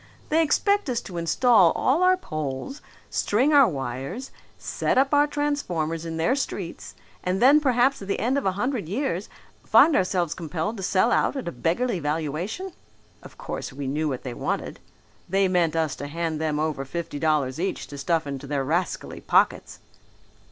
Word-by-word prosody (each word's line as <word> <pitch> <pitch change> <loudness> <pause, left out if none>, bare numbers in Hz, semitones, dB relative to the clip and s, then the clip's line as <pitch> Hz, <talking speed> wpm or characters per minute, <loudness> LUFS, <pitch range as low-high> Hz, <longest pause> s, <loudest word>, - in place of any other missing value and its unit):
They 320 +2 +3
expect 400 +4 +2
us 240 -2 0
to 175 -3 -6
install 190 +1 +4
all 285 +7 +1
our 370 0 +5
poles, 155 - -5 0.3
string 255 +9 +2
our 280 -3 +7
wires, 135 - -5 0.3
set - - -1
up 270 +2 +3
our 290 0 +5
transformers 175 - -2
in 165 0 -4
their 165 +11 +2
streets 200 -10 -5 0.3
and 185 +1 0
then 275 +6 +7
perhaps 260 -2 +2
at 195 - -8
the 200 - -1
end 250 +4 +1
of 280 - 0
a 190 - +1
hundred 220 - -2
years 210 -4 -2 0.3
find 320 - +6
ourselves 180 -3 +1
compelled 165 +6 -4
to - - -6
sell 190 +5 +2
out - - +2
at 270 - -4
a - - -2
beggarly 180 - -1
valuation. 165 - -3 0.5
Of - - -14
course - - -5
we 140 +1 -6
knew 150 +3 -1
what 130 -3 -4
they 125 - -5
wanted. - - -3 0.5
They 195 +1 +3
meant 175 -3 +1
us 160 -4 0
to 145 - -5
hand 160 0 -3
them 155 -1 0
over 155 -3 -1
fifty 145 +1 -5
dollars 150 -4 +1
each 190 +3 -2
to 145 - -10
stuff 165 +2 0
into 140 0 -6
their 140 -1 -1
rascally 170 +6 -2
pockets." - - +1
180 Hz, 180 wpm, -25 LUFS, 155-255 Hz, 0.5 s, our